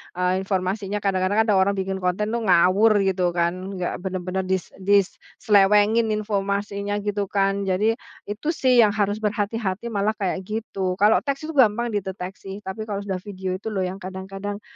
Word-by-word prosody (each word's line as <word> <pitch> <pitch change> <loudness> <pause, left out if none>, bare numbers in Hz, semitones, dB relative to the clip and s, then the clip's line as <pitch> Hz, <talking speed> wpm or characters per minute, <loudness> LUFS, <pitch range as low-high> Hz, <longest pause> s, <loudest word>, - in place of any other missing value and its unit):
eee, 180 +1 +1
informasinya. 195 +1 -2
Kadang-kadang 195 +2 +2
ada 210 -3 +2
orang 200 +1 +3
bikin 190 0 -2
konten 185 +4 -1
tuh 235 - 0
ngawur 195 +4 +5
gitu 180 -2 +1
kan, 180 +3 -1
nggak 180 -1 -3
bener-bener 185 0 -3
dis 190 -2 -1
diselewengin 205 +2 +3
informasinya, 200 -1 -2
gitu 205 -1 -1
kan. 195 0 0
Jadi, 215 +5 +1 0.3
itu 210 +9 -5
sih 255 -2 +3
yang 205 - +1
harus 205 0 +1
berhati-hati 210 0 -2
malah 205 +1 +1
kayak 190 -1 -2
gitu. 200 -4 -2
Kalau 210 +1 +6
teks 280 +1 -2
itu 320 - -4
gampang 240 -4 +3
dideteksi, 195 0 -5
tapi 215 +3 -5
kalau 200 -1 -3
sudah 190 -2 -3
video 190 -1 -5
itu 205 - -9
loh 190 - -1
yang 185 +1 -3
kadang-kadang, 195 +2 -6
200 Hz, 165 wpm, -23 LUFS, 190-210 Hz, 0.3 s, Kalau